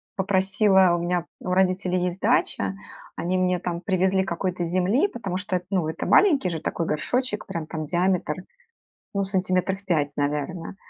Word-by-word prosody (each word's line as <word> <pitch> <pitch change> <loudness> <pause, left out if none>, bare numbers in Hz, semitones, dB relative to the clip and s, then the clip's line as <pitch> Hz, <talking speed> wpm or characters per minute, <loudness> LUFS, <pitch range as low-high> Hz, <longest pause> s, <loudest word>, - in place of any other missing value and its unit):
попросила 190 -1 +3
у 170 - -2
меня 175 0 -1 0.2
у - - -5
родителей 185 0 +2
есть 180 +1 -4
дача, 225 -3 +1 0.4
они 185 +2 -1
мне 180 -1 +1
там 175 -1 -4
привезли 190 0 +2
какой-то 180 0 -2
земли, 185 - +2
потому 195 -6 -4
что 190 -1 -1
эт 180 - -9
ну 185 -5 0
это - - -4
маленький 295 - +4
же 160 -2 -4
такой 170 - -2
горшочек, 210 +9 -1
прям 160 -2 -5
там 155 -1 -4
диаметр, 175 -1 +1 0.8
ну 200 - +1
сантиметров 190 0 0
5, 150 -6 +1
наверное. 150 +5 -2
185 Hz, 160 wpm, -24 LUFS, 175-190 Hz, 0.8 s, маленький